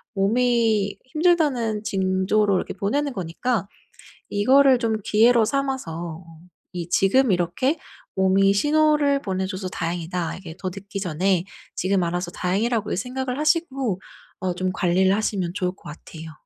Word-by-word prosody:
몸이 220 0 +2
힘들다는 270 -8 +1
징조를 195 0 +1
이렇게 180 - -2
보내는 275 +9 -1
거니까 195 +4 -2 0.6
이거를 260 +6 +5
좀 225 -2 0
기회로 230 +3 +4
삼아서 180 - -3 0.5
'이 175 -2 -4
지금 220 +7 +3
이렇게 180 - 0 0.4
몸이 195 +1 +3
신호를 295 +3 +3
보내줘서 190 -1 -3
다행이다.' 170 0 -3
이게 170 -3 -10
더 185 - -3
늦기 200 +1 -7
전에 180 0 0 0.3
지금 190 0 +1
알아서 175 +1 -2
다행이라고 210 +5 -1
생각을 255 +5 -3
하시고 275 - 0 0.4
어 185 -1 -1
좀 185 +1 -1
관리를 185 +2 +2
하시면 195 -5 -1
좋을 180 -3 -1
것 190 - -23
같아요. 160 +1 -10
200 Hz, 305 characters per minute, -23 LUFS, 185-250 Hz, 0.6 s, 이거를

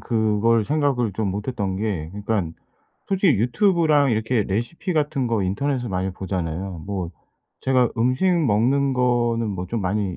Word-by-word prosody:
그걸 110 0 +2
생각을 135 -5 0
좀 100 0 -1
못했던 100 -2 -3
게 100 -7 -2
그니깐 100 -5 -2 0.5
솔직히 190 - +2
유튜브랑 155 - +3
이렇게 110 0 0
레시피 120 - -2
같은 145 -4 0
거 115 -3 0
인터넷에서 125 +7 -1
많이 95 0 -1
보잖아요. 90 -2 -4
뭐 95 -4 -3 0.5
제가 130 -2 +2
음식 125 +9 +2
먹는 135 - +2
거는 120 -2 +1
뭐 90 -2 -4
좀 115 +4 -3
많이 95 0 -1
115 Hz, 315 characters per minute, -23 LUFS, 100-130 Hz, 0.5 s, 유튜브랑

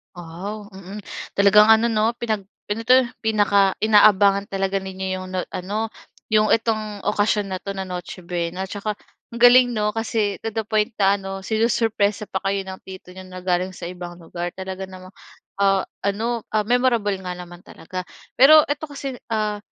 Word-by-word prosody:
Wow, 190 +5 -7
mm. 195 +2 -9 0.3
Talagang 200 +1 +6
ano 225 +1 +5
'no, 220 +1 +1
pinag 220 -5 -3 0.2
ano 210 +2 -1
'to? 255 +1 +7 0.2
Pinaka 205 -3 +2
inaabangan 205 -2 +5
talaga 195 0 -1
ninyo 190 0 -6
'yong 185 - -7
no 185 - 0
ano, 210 +5 -3 0.4
'yong 215 0 +4
itong 215 -3 -2
okasyon 205 -1 0
na 185 - -3
'to 200 +1 -6
na 195 - -4
Noche 180 0 -7
Buena. 175 +1 -3
'Tsaka 205 +2 -4 0.4
ang 235 - -6
galing 245 0 +7
'no? 210 -1 0
Kasi 215 -2 -1
'no, - - -9
to 225 - -4
the 225 - 0
point 215 +1 0
na 200 +1 +4
ano, 195 0 -7
sinusurpresa 220 -1 0
pa 190 - -1
kayo 195 0 0
ng 190 0 -8
tito 185 -1 -10
niyo 185 0 -11
na 185 0 -9
galing 185 0 -1
sa 170 0 -7
ibang 175 -1 -8
lugar. 175 0 -6
Talaga 190 0 -6
namang 185 0 -12 0.5
ah, 195 -1 +3 0.2
ano, 225 +3 -2
ah, 215 - +3
memorable 235 -4 +1
nga 180 -1 -5
naman 175 -1 -10
talaga. 185 +2 -7 0.3
Pero 305 +4 +9
eto 290 +2 -2
kasi, 275 -3 -6 0.2
ah, 210 -1 -1
200 Hz, 175 wpm, -22 LUFS, 190-220 Hz, 0.5 s, Pero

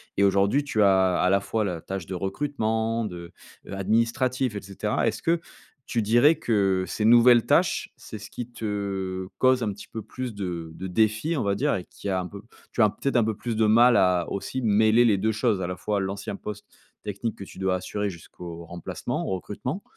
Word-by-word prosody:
et 100 - +2
aujourd'hui 100 +8 +3
tu 115 -7 0
as, 95 -2 +4
à 90 - +3
la 100 +1 +3
fois 110 +1 -1
la 85 -4 -3
tâche 95 -3 -5
de 95 - -5
recrutement 110 +1 -1
de, 85 -4 -7 0.3
heu, - - -7
administratif 115 +4 0
et 100 - -4
cetera. 95 0 -2
Est-ce - - -1
que 165 0 +1 0.4
tu 115 - -1
dirais 120 +9 +5
que 100 -9 +1
ces 105 - -3
nouvelles 120 +1 +6
tâches, - - +2
c'est - - -9
ce - - -10
qui 120 - -5
te 100 -4 -3
cause 130 -1 +3
un 105 - 0
petit 100 - -12
peu 110 - -6
plus 120 +2 -6
de 85 -5 -5
de 95 +2 -6
défis, 110 - +1
on 135 - -1
va 100 0 +1
dire, - - +1
et 90 - -4
qui - - -9
a 95 -2 0
un 90 - -5
peu 100 +1 -10 0.3
tu 120 - 0
as 105 - +6
peut-être 135 +4 -1
un 115 - +4
peu 110 -1 -1
plus 115 +1 -4
de 110 - +3
mal 120 +3 +6
à 90 -2 +3
aussi 130 +6 -3
mêler 110 +1 +4
les 110 -5 +4
2 110 +3 0
choses 105 -3 +1
à 90 - -2
la 90 - -3
fois? 100 +3 -1
L'ancien 100 +1 -4
poste 105 -1 -7 0.4
technique 105 +2 -3
que 100 - -7
tu 95 - -12
dois 95 -1 +1
assurer 105 +2 -3
jusqu'au 85 -1 -9
remplacement, 85 0 -4
au 95 - 0
recrutement 125 - -5
105 Hz, 215 wpm, -25 LUFS, 95-115 Hz, 0.4 s, nouvelles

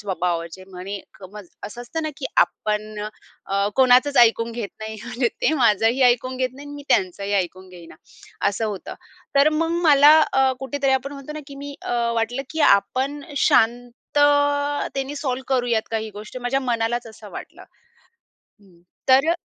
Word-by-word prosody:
स्वभावाचे 180 -2 -3
म्हणे 190 +2 -6 0.2
क 195 - -14
म 210 - -9 0.3
असं 240 +3 -9
असतं 320 +7 -5
ना 310 - -2
की 265 - -4
आपण 215 0 0 0.5
अ, 200 +1 0
कोणाचंच 260 +2 +5
ऐकून 230 -1 +4
घेत 230 -3 -4
नाही 220 0 -6
म्हणजे 245 0 -1
ते - - +3
माझंही 225 +4 +3
ऐकून 250 +1 +2
घेत 255 0 0
नाही 285 +2 -11
आणि 290 - -9
मी 285 - -9
त्यांचंही 200 +2 0
ऐकून 185 0 -2
घेईना. 175 -3 -13 0.5
असं 205 +3 -2
होतं. 200 -3 -6 0.4
तर 280 +2 +5
मग 325 +2 0 0.2
मला 290 +2 +8
अ, 265 0 +3
कुठेतरी 270 +1 -1
आपण 265 +2 -1
म्हणतो 280 +1 -8
ना 305 - -6
की 280 - -10
मी 285 0 -7
अ, - - -4 0.2
वाटलं 230 +4 -1
की 315 - -4
आपण 260 +8 0 0.2
शांततेने 285 +4 +1
सॉल्व्ह 260 -2 -3
करूयात 240 -3 +1
काही 220 -1 -3
गोष्टी 215 +4 -8
माझ्या 245 +2 -1
मनालाच 240 -1 -1
असं 220 - -12
वाटलं. - - -10 1.0
हं. 185 -4 -23 0.3
तर 270 +4 +6
अ - - +1
245 Hz, 165 wpm, -22 LUFS, 210-275 Hz, 1.0 s, मला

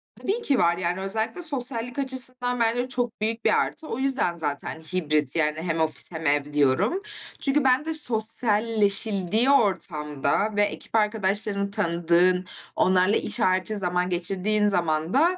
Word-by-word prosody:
Tabii 430 +5 -3
ki 280 - +1
var, 170 0 +2
yani, 180 +1 -2
özellikle 220 - -2
sosyallik 250 -4 -2
açısından 255 -2 -2
bence 235 +2 +1
çok 245 -3 -3
büyük 225 +1 -2
bir - - +4
artı. 315 - -3
O 245 - -4
yüzden, 265 -10 0
zaten, 150 0 -4
hibrit, 155 -4 0
yani 155 -1 0
hem 165 -1 -2
ofis, 160 +1 +1
hem 160 -1 -7
ev 145 0 0
diyorum. 150 - +1 0.4
Çünkü 280 +1 +1
bende 270 +5 +2
sosyalleşildiği 220 - 0
ortamda 190 - +1
ve 205 - +2
ekip 205 +2 -3
arkadaşlarını 205 -1 +1
tanıdığın, 180 -2 +2 0.3
onlarla 185 +2 +3
iş - - 0
harici 185 +1 +1
zaman 180 -2 -1
geçirdiğin 195 +4 +1
zaman 165 -3 -1
da, 340 +7 +3
205 Hz, 145 wpm, -24 LUFS, 175-245 Hz, 0.4 s, bir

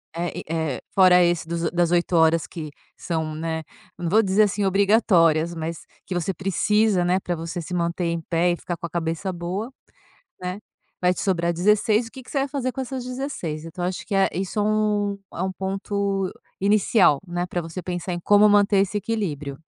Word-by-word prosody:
eh, 170 0 -2
e, - - -7
eh, 160 -4 -2
fora 180 -2 +7
esse 170 -1 +1
dos 170 -1 -1
das 175 -1 +1
8 175 0 +2
horas 160 0 +4
que 155 -3 -7 0.3
são 160 -2 -3
né, 160 0 -3 0.3
não 175 -1 -3
vou 220 +4 +4
dizer, 200 +2 +4
assim, 205 0 0
obrigatórias, 180 -5 +3
mas 165 0 -5 0.2
que 185 - -4
você 175 +2 -1
precisa, 195 0 +1
né, 180 +2 +2
para 175 -2 -3
você 165 +1 -5
se 180 +3 -7
manter 170 +1 -1
em 170 0 -1
pé 170 +2 +1
e - - 0
ficar 175 - -4
com 170 - -6
a - - -18
cabeça 165 +3 -2
boa, 185 +8 -4 0.7
né, 180 +2 -4 0.4
vai 180 0 +3
te - - -4
sobrar 170 -3 +1
16. 210 +5 +2
O - - -14
que 260 - -10
que - - -16
você 275 - -1
vai 275 - 0
fazer 255 -2 -2
com 265 - -4
essas 260 -1 -5
16? 250 - -4
Então, 175 +2 -6
acho 180 +1 -3
que 205 - -5
é 195 0 +3
isso, 190 +3 -3
é - - +3
um 210 -1 +1 0.2
é - - -4
um 190 0 -1
ponto 195 0 -2 0.3
inicial, 200 - +4
né, 175 +1 -2
para 175 -1 -2
você 165 +2 -6
pensar 175 0 -4
em 175 - -3
como 205 +3 +5
manter 205 0 +4
esse 195 +1 +1
equilíbrio. 155 -10 -3
180 Hz, 205 wpm, -23 LUFS, 170-205 Hz, 0.7 s, fora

